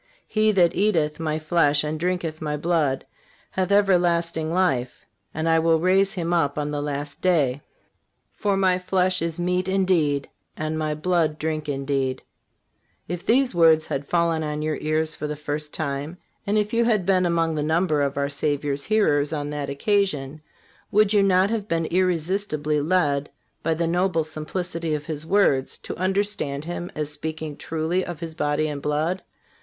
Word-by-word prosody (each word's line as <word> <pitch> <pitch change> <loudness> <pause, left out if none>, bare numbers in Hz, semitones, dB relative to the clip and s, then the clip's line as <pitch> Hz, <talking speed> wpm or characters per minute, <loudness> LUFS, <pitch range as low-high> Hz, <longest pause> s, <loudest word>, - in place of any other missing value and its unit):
He 215 0 +2
that 175 -3 +4
eateth 165 -7 +1
My 155 -1 -1
flesh 155 -2 +2
and 155 +1 -3
drinketh 175 -2 -2
My 150 -1 -2
blood 150 -4 0 0.5
hath 190 0 -1
everlasting 175 -5 +2
life, 135 -9 0 0.3
and 160 +1 -2
I 165 0 +4
will 165 0 +3
raise 190 +3 +3
him 175 -3 -2
up 145 -5 +1
on 150 0 -2
the 145 -1 -2
last 145 0 -4
day. 145 -7 +2 0.7
For 200 -1 0
My 185 -1 +3
flesh 185 0 +1
is 165 0 -2
meat 180 +1 0
indeed, 175 -7 +1 0.3
and 155 0 -2
My 155 -1 -1
blood 160 -1 +1
drink 155 -1 -3
indeed."(367) 135 -2 -1 0.9
If 175 0 -4
these 255 +1 +3
words 160 -2 +5
had 140 +1 -4
fallen 170 -2 +1
on 150 0 -3
your 155 0 -1
ears 155 +1 0
for 150 - -5
the 150 - -3
first 150 0 -4
time, 145 +2 -3 0.3
and 205 +1 +2
if 210 +1 0
you 235 0 +3
had 215 -6 +2
been 185 -1 +3
among 165 -1 +1
the 150 - -1
number 155 0 +1
of 140 0 -1
our 140 0 +1
Savior's 145 0 -2
hearers 150 -10 +2
on 145 -2 -3
that 145 -1 -3
occasion, 150 -3 0 0.5
would 210 0 +3
you 205 - +5
not 195 +1 +3
have 215 -3 -2
been 165 -2 0
irresistibly 170 -3 0
led, 145 -4 +1 0.3
by 160 0 0
the 170 +1 0
noble 175 0 +1
simplicity 165 +1 -3
of 150 0 -5
His 155 0 -5
words, 150 -10 +2
to - - -7
understand 185 -6 -1
Him 175 +1 -5
as 150 -1 -3
speaking 155 0 -5
truly 165 +5 -1
of 175 -3 -6
His 165 -1 -6
body 150 0 0
and 145 -2 -4
blood? 155 +6 -1
160 Hz, 170 wpm, -24 LUFS, 150-180 Hz, 0.9 s, words